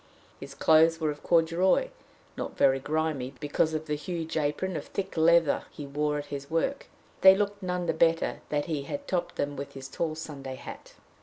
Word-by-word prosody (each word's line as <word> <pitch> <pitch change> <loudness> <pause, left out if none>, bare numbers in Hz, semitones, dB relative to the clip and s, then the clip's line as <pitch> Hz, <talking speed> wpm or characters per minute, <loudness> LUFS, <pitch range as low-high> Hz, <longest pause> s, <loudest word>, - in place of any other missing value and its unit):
His 140 0 -9
clothes 160 +2 +5
were 155 -2 0
of 145 - -9
corduroy, 175 - +3 0.5
not - - -5
very 135 0 +4
grimy, 145 -3 -2
because 155 +2 0
of 155 0 -3
the 150 - -2
huge 165 +2 -4
apron 160 +4 -1
of - - -4
thick 195 -1 -4
leather 165 -1 +4
he 145 - -8
wore 150 +1 -1
at 145 - -4
his 140 0 -6
work, 165 - -1
but - - -31
they 190 0 +9
looked 205 0 -1
none 180 -1 -2
the 165 - +1
better 165 +1 +2
that 145 -1 0
he 155 -4 -2
had 285 - -6
topped 175 -2 -2
them 145 0 -2
with 140 0 -7
his 135 0 -7
tall 155 +3 -3
Sunday 140 -4 -7
hat. - - -10
160 Hz, 200 wpm, -28 LUFS, 145-170 Hz, 0.5 s, they